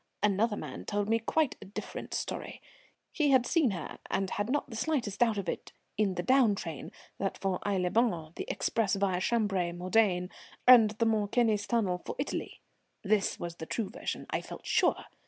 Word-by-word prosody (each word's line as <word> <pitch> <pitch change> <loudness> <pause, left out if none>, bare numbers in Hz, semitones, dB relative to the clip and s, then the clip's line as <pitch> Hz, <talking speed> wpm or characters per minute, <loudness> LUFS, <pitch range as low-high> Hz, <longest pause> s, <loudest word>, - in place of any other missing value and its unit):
Another 210 +1 +2
man - - -6
told 205 -1 -1
me 225 +1 +2
quite 295 +5 0
a - - -9
different 200 - -6
story; - - -4 0.5
he 300 -3 +1
had 260 -3 +5
seen 315 -4 +3
her, 190 -4 -5
and 195 -1 -1
had 205 +2 -2
not 290 +2 0
the - - -6
slightest 235 -6 -1
doubt 230 -3 +3
of 195 -3 -3
it, - - -4 0.2
in 200 -3 +1
the 175 - -2
down 255 -2 +4
train, 165 -6 -6 0.3
that 195 - -2
for 190 -2 -1
Aix 200 -2 +1
les 180 0 +1
Bains, 175 -8 +1
the - - -4
express 215 -4 0
via 190 -2 0
Chambery, 195 -6 +1
Modane, 180 0 +1 0.4
and 240 -4 +9
the 230 - +2
Mont 215 -2 +1
Cenis 220 -4 +2
tunnel 195 -7 0
for - - -5
Italy. 275 - -4 0.4
This 210 -1 +1
was 170 0 -5
the 160 - -7
true 210 -5 -2
version, - - -4
I - - 0
felt - - -10
sure. - - +2
205 Hz, 190 wpm, -30 LUFS, 185-230 Hz, 0.5 s, and